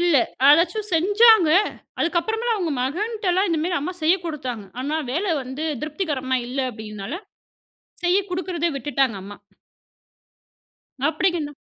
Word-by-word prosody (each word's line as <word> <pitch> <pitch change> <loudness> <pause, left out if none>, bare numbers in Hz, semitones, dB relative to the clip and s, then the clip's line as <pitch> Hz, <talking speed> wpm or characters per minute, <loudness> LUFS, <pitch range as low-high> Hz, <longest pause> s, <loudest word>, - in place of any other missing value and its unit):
இல்ல, 345 -3 +4 0.3
அதாச்சும் 340 +8 +4
செஞ்சாங்க. 410 +2 +6 0.5
அதுக்கு 345 +1 +1
அப்புறமேல 450 +4 -1
அவங்க 350 -5 -2
மகன்ட்டலாம் 385 - 0
இந்த 330 - +1
மாதிரி 350 -1 0
அம்மா 335 +6 -3
செய்யக் 350 +3 +2
குடுத்தாங்க. 260 -10 -4 0.2
ஆனா 305 +3 -1
வேலை 340 +6 0
வந்து 265 +5 -5 0.2
திருப்திகரமா 295 -5 -2
இல்ல 260 +3 -3
அப்படின்னால, 215 +2 -7 0.9
செய்யக் 375 +2 +2
குடுக்கிறதே 355 -2 -1
விட்டுட்டாங்க 270 -5 0
அம்மா. 205 +1 -10 1.7
அப்படிங்க் 320 -1 0
330 Hz, 120 wpm, -23 LUFS, 275-370 Hz, 1.7 s, செஞ்சாங்க